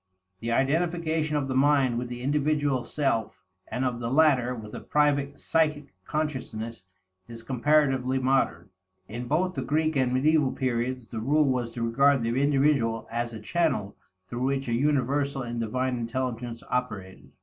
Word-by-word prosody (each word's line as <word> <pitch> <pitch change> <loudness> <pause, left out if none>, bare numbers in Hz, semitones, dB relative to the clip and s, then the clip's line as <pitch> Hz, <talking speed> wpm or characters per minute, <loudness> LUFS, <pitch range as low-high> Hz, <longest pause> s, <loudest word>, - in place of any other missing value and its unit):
The 115 +3 -3
identification 160 +3 +1
of 145 -2 0
the 130 - -2
mind 135 -3 +3
with 125 - -4
the 120 0 -7
individual 145 -2 +1
self 135 -7 -1 0.2
and 130 +1 -2
of 120 -2 -1
the 115 -1 -3
latter 130 -3 +3
with 105 -2 -9
a - - -5
private 145 -1 +1
psychic 150 -4 0
consciousness 115 - -4 0.4
is 115 -1 -9
comparatively 135 0 +2
modern. 130 -9 0 0.4
In 120 +3 -6
both 180 +6 +1
the 135 - -3
Greek 155 +4 0
and 130 -2 +2
medieval 145 +1 +3
periods, 125 -1 -2
the 115 - -5
rule 145 +7 +3
was 125 -3 0
to 120 - -2
regard 135 +3 +3
the 120 +3 0
individual 135 -5 +2
as 120 +1 -2
a 110 - -7
channel 130 - -1 0.3
through 120 +5 -5
which 135 0 -1
a 120 - -1
universal 140 +1 +1
and 120 -1 -4
divine 125 +3 -1
intelligence 120 -1 -3
operated. 105 -7 -4
130 Hz, 160 wpm, -27 LUFS, 120-145 Hz, 0.4 s, mind